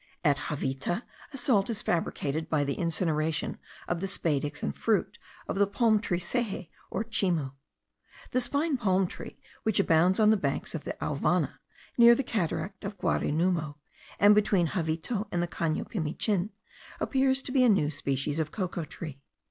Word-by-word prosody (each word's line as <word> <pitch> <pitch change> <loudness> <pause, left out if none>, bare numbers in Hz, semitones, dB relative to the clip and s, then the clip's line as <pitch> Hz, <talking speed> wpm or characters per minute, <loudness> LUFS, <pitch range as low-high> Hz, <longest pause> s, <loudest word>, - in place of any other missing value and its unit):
At 145 -3 +2
Javita 145 - -2 0.3
a 275 - -6
salt 245 -6 +2
is 220 -3 -1
fabricated 160 -2 -1
by 150 -2 +2
the 140 0 -1
incineration 160 -2 -1 0.3
of 175 - -1
the 195 - -1
spadix 150 -5 -1
and 70 - -2
fruit - - 0 0.3
of 195 - -2
the 200 - +5
palm 220 +1 +3
tree 185 -4 -1
seje 195 -2 -2 0.2
or 215 - -2
chimu. 180 -11 0 0.8
This 255 -1 +3
fine 285 0 0
palm 190 -5 +2
tree, - - -8 0.2
which 220 -3 +1
abounds 180 +1 +4
on 215 0 +6
the 220 - +4
banks 190 - -2
of - - -5
the - - -3
Auvana, - - 0 0.4
near 235 0 +9
the 275 - -1
cataract 195 -2 -2
of 200 +1 -5
Guarinumo, 165 -3 0 0.4
and 205 +1 +7
between 200 -5 +3
Javita 180 +5 -2
and 175 - 0
the - - -1
Cano 165 -2 -1
Pimichin, 190 +2 -1 0.5
appears 265 0 +2
to - - -5
be 260 -1 +4
a 245 - +6
new 170 -8 +3
species 140 +1 -2
of 155 -1 -1
cocoa 180 -5 -3
tree. 150 -3 -8
180 Hz, 165 wpm, -29 LUFS, 155-215 Hz, 0.8 s, near